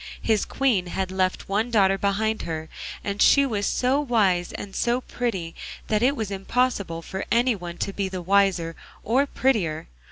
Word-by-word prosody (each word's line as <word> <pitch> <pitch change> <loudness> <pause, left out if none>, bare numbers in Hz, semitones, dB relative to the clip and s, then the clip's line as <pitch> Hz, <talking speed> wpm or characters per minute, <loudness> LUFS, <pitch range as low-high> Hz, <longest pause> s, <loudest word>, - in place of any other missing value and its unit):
His 220 -2 +1
Queen 230 -10 +1
had 185 +1 -3
left 185 -1 -1
one 210 +4 0
daughter 195 -4 +4
behind 205 +3 0
her, 160 -1 -5 0.3
and 200 0 -3
she 280 0 +6
was 205 -6 -1
so 260 +3 +1
wise 200 -10 +1
and 195 -1 -7
so 240 +1 +1
pretty 190 -11 -3 0.4
that 215 -1 +2
it 265 +4 +3
was 220 -6 -3
impossible 195 -4 -1
for 190 +2 -5
any 240 +1 +3
one 175 -4 -7
to 195 - -3
be 195 -1 -2
wiser 185 -2 +1 0.3
or 260 +6 +2
prettier. 195 - 0
200 Hz, 165 wpm, -24 LUFS, 185-235 Hz, 0.4 s, she